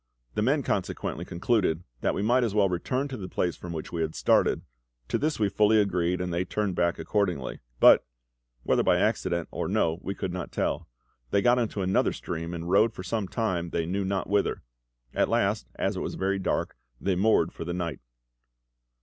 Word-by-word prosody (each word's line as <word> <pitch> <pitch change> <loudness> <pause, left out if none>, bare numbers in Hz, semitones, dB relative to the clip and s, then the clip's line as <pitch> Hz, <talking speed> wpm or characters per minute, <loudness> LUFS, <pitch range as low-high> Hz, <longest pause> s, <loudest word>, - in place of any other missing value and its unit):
The - - -1
men 140 +6 +2
consequently 95 -5 -2
concluded 90 -2 0 0.2
that - - 0
we 100 - -1
might 125 +4 +3
as 110 -3 -1
well 100 -2 +4
return 125 +10 -1
to 130 - -5
the 95 -3 -6
place 90 -1 -1
from 90 - -8
which 80 -2 -5
we 85 - -2
had 80 -1 -2
started; - - +3 0.5
to - - +1
this 155 -2 0
we 105 - +3
fully 105 +3 +4
agreed, 90 -3 +1
and 90 -1 -2
they 85 +2 +1
turned 105 0 -1
back 85 0 +1
accordingly. 90 -10 -1 0.2
But - - +8 0.6
whether - - +3
by - - +3
accident 85 -2 0
or - - -3
no 80 +1 +1
we 100 - -4
could 95 -3 -3
not 90 - -5
tell - - -1 0.4
they 100 - +2
got 125 0 +5
into 105 -4 -1
another 95 +1 +2
stream, 85 0 -5
and 85 0 -5
rowed 105 +5 +4
for 90 - -6
some 100 +1 -2
time 90 -6 -1
they 85 -1 -1
knew 95 +4 -1
not 95 -1 -1
whither. 100 0 0 0.5
At - - +2
last, - - +1
as - - -1
it - - -3
was - - -3
very 95 +1 0
dark, 95 - -1 0.2
they 95 -2 0
moored 95 -3 +3
for - - -6
the 85 - -4
night. 85 -6 -3
95 Hz, 200 wpm, -27 LUFS, 85-105 Hz, 0.6 s, But